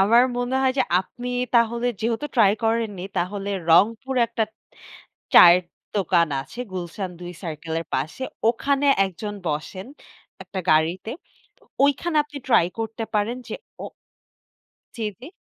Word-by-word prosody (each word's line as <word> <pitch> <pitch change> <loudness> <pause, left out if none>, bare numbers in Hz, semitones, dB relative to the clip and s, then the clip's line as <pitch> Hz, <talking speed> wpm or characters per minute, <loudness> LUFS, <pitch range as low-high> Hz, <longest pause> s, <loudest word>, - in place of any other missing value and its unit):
আমার 225 +5 +6
মনে 245 +2 -1
হয় 260 - +3
যে - - +5 0.2
আপনি 245 +6 -8 0.3
তাহলে 235 +1 +3
যেহেতু 230 +6 -1
ট্রাই 210 -5 +5
করেননি 225 -5 -1
তাহলে 195 +3 -2 0.2
রংপুরে 230 +8 +3
একটা 220 -2 -2 0.8
চায়ের 175 +1 +9 0.3
দোকান 175 -3 +3
আছে 235 - -12
গুলশান 180 +1 -4
২ 175 0 -7
সার্কেলের 165 0 -4
পাশে, 210 +12 -2 0.3
ওখানে 280 +4 +1 0.2
একজন 200 +3 -6
বসেন 155 +5 -4 0.6
একটা 190 - -6
গাড়িতে। 165 +7 +1 0.7
ওইখানে 310 +4 0
আপনি 295 -1 -10
ট্রাই 175 -9 +4
করতে 225 0 -3
পারেন 220 +4 0
যে - - -4 0.3
ও - - -4 1.1
জি, 230 - -3 0.2
জি। 265 - -9
215 Hz, 130 wpm, -23 LUFS, 180-245 Hz, 1.1 s, চায়ের